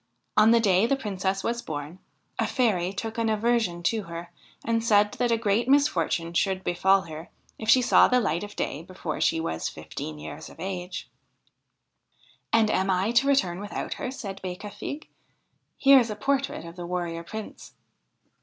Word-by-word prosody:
On 215 +1 +6
the 235 0 +6
day 200 -1 +3
the 275 - +2
Princess 195 -5 -2
was 235 0 -1
born 150 +1 -6 0.4
a - - +2
fairy 200 -9 +1
took 225 +3 -5
an 225 -1 +1
aversion 215 -5 +1
to 220 +4 +1
her, 170 +1 -8 0.3
and 230 0 +1
said 210 -2 +4
that 245 -1 -1
a 230 - +3
great 225 +2 +1
misfortune 170 - +2
should 190 +1 0
befall 190 +2 +3
her 160 -1 -9 0.3
if 220 - -4
she 255 +2 +6
saw - - +6
the 250 - +3
light 170 -6 -1
of 205 0 -8
day 145 - -3
before 165 -2 -6
she 165 - +2
was 80 - -2
fifteen 75 -1 -7
years 75 +1 -8
of - - -16
age.' 185 0 -5 1.4
'And 220 -2 +4
am 190 +1 +1
I 190 +4 +1
to 240 +3 +3
return 190 -11 +2
without 205 +1 -4
her?' - - -2
said 200 -7 -7
Becafigue. 205 +10 -6 0.4
' - - -47 0.3
Here 275 0 +7
is 235 -2 0
a 210 - -3
portrait 275 -1 -1
of 170 +1 -10
the 175 -1 -6
Warrior 175 -2 -3
Prince.' 215 +5 -8
195 Hz, 180 wpm, -26 LUFS, 175-230 Hz, 1.4 s, Here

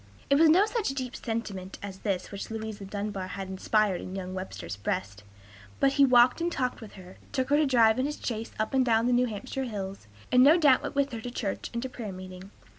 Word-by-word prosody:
It 280 - +5
was 325 0 +7
no 365 +6 +6
such 435 - -1
deep 255 -2 -4
sentiment 205 -5 -5
as 195 -1 -7
this 190 -3 -2
which 200 -1 -6
Louisa 220 -2 -5
Dunbar 200 -1 -4
had 190 0 -6
inspired 195 0 +1
in 185 - -7
young 185 -1 -5
Webster's 185 - -6
breast; 100 0 -3 0.6
but 275 - +4
he 280 0 +6
walked 250 +3 +5
and 345 +1 0
talked 255 -6 -2
with 220 - -10
her, 185 -1 -13
took 260 -1 -1
her 290 - +5
to 305 -1 +3
drive 230 -3 +4
in 265 - +1
his 295 - -5
chaise 225 -1 -4
up 215 +5 -2
and 265 -1 +4
down 230 -2 +2
the 250 - +2
New 250 +1 +3
Hampshire 260 +5 -4
hills, 195 - -6 0.2
and 250 - +6
no 300 +5 +7
doubt 290 -6 +5
went - - -5
with 280 -1 +1
her 230 -2 -5
to 245 - -5
church 220 -5 -4
and 235 0 -3
to - - -2
prayer 230 -5 -6
meeting. 185 0 -9
225 Hz, 235 wpm, -28 LUFS, 195-260 Hz, 0.6 s, was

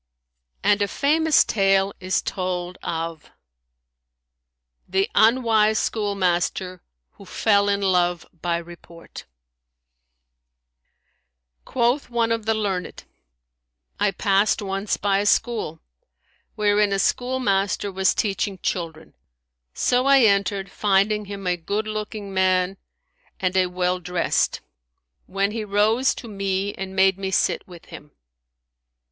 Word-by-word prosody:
'" 60 0 -49
And 205 +1 +3
a 205 - +2
famous 310 +7 +3
tale 195 -1 +2
is 185 0 -1
told 180 -1 -4
of 165 -1 -5 1.6
THE 190 +2 +1
UNWISE 220 -2 +4
SCHOOLMASTER 185 -4 -1 0.3
WHO 200 - -16
FELL 200 0 +2
IN 200 0 0
LOVE 180 -3 +1 0.2
BY 170 -1 0
REPORT 170 0 -12 2.4
Quoth 245 +3 0
one 235 -1 0
of 225 -1 -2
the 225 - +2
learned, 195 -4 -3 1.0
"I 210 - +3
passed 195 +1 +1
once 195 +1 -2
by 200 -1 +1
a 205 - -1
school, 205 -10 0 0.7
wherein 210 -1 +2
a - - +1
schoolmaster 205 -4 0
was 190 0 +1
teaching 195 -1 -1
children; 165 -3 -4 0.6
so 250 +2 +1
I 275 -1 +6
entered, 200 -3 +1
finding 210 +1 +1
him 200 -1 -8
a 180 -1 +1
good 200 +6 -3
looking 215 -2 -5
man 185 0 +1 0.6
and 185 0 -1
a 185 -1 +3
well 180 0 -1
dressed; 180 -1 -1 0.7
when 195 +2 -1
he 220 0 -4
rose 215 +5 +2
to 235 - -9
me 195 -1 -2
and 190 0 -7
made 190 0 +3
me 190 -1 -3
sit 190 - 0
with 175 -2 -13
him. 150 -1 -11
195 Hz, 120 wpm, -23 LUFS, 185-210 Hz, 2.4 s, I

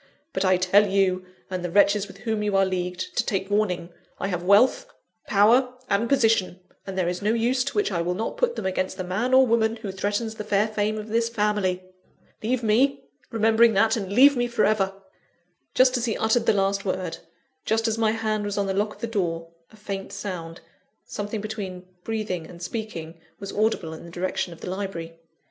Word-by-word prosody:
But 190 - 0
I 185 -1 +4
tell 195 +3 +4
you, 190 -2 +1 0.2
and 185 -1 -3
the 175 - -2
wretches 200 +2 +3
with 190 - -13
whom 220 -2 -1
you 205 -2 +1
are 195 - +4
leagued, 180 -1 -3
to - - +3
take 195 0 -2
warning: 180 -5 0 0.3
I 195 - -2
have 180 -2 -2
wealth, 215 - +4 0.4
power, 240 +5 +4 0.2
and 210 +4 +1
position; 225 -8 +2 0.3
and 190 -1 -5
there 180 -2 +1
is 180 0 -2
no 210 +2 +1
use 245 +3 +1
to 280 - -3
which 415 - +1
I 170 -3 0
will 175 +1 -1
not 220 +4 -3
put 480 -1 0
them - - -5
against 185 0 -1
the 185 - -3
man 195 +8 -1
or 260 0 +7
woman 225 -1 +2
who 220 -4 -6
threatens 205 +4 -2
the 215 - -6
fair 210 0 +2
fame 215 0 -1
of 215 0 -6
this 230 +1 +1
family. 205 -5 0 0.6
Leave 245 +2 -1
me, 240 +6 +2 0.3
remembering 225 0 +4
that 220 +3 +4
and 200 -4 -4
leave 275 +6 +7
me 245 -1 +1
for 235 -2 +1
ever!" 195 -2 +1 0.8
Just 255 0 +5
as 240 - -1
he 225 - -1
uttered 225 +1 +1
the - - +7
last 195 0 +1
word, 185 -3 -3 0.4
just 225 +1 +1
as 225 0 -1
my 220 -1 +3
hand 215 -1 -1
was 205 0 -3
on 200 - +1
the 195 - -1
lock 210 +2 -1
of - - -21
the - - -1
door, 170 -7 -2 0.2
a - - -16
faint 200 -2 -6
sound 180 -5 -6 0.4
something 205 +1 -4
between 200 -4 -6 0.2
breathing 210 -7 -3
and 175 0 -11
speaking 170 -6 -6 0.2
was 200 - -6
audible 205 -7 0
in 160 - -10
the 170 - -10
direction 180 +1 -2
of 165 - -12
the - - -5
library. 170 -4 -5
205 Hz, 210 wpm, -25 LUFS, 185-225 Hz, 0.8 s, or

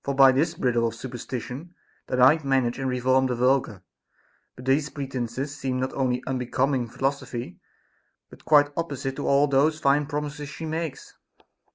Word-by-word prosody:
by 135 -1 +8
this 155 +6 +1
bridle 120 -2 +1
of 115 - -5
superstition 130 +6 -7 0.3
they - - -2
might 140 +5 +5
manage 135 -3 +1
and 135 -1 -1
reform 130 +1 +2
the 125 - -1
vulgar; 125 -6 +1 0.7
but 125 - -11
these 140 +3 +2
pretences 135 0 -4
seem 130 -2 -2
not 130 +1 -2
only 125 -2 0
unbecoming 130 0 0
philosophy, 125 -6 -3 0.7
but - - -15
quite 145 -1 +5
opposite 140 -5 -3
to - - -4
all 140 +1 +4
those 145 +3 +2
fine 140 0 +2
promises 150 -1 -4
she 160 +2 -7
makes. 160 -2 -5
135 Hz, 155 wpm, -25 LUFS, 125-145 Hz, 0.7 s, by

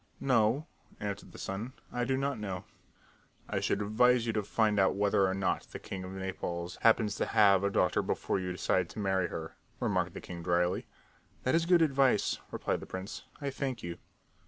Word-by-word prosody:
"No," 125 +2 +2 0.3
answered 100 -1 -5
the - - -12
son. 110 +7 -4 0.2
"I 120 0 0
do 130 +1 +1
not 135 -3 -1
know." 95 -3 -4 0.8
"I - - -1
should - - 0
advise 120 +3 +4
you 115 - 0
to 105 - +1
find 105 0 +1
out 95 0 +4
whether 100 -1 +3
or 95 - 0
not 95 -1 -1
the - - -6
king 95 -1 -6
of 95 +1 -7
Naples 90 -2 -4
happens 110 -2 +4
to - - 0
have 100 -2 +5
a 100 - +3
daughter 90 -2 +2
before - - -1
you 90 -1 -3
decide 90 0 +1
to - - -12
marry 95 -3 +1
her," 80 -1 -6 0.2
remarked - - 0
the - - -4
king 85 -1 -7
dryly. 90 +2 +1 0.6
"That 130 - +1
is 165 0 +2
good 175 -2 +6
advice," 135 -7 +3
replied - - -1
the - - -9
prince. 95 +3 -6
"I 140 -1 -2
thank 130 -3 -3
you." 85 0 -5
100 Hz, 195 wpm, -31 LUFS, 95-125 Hz, 0.8 s, good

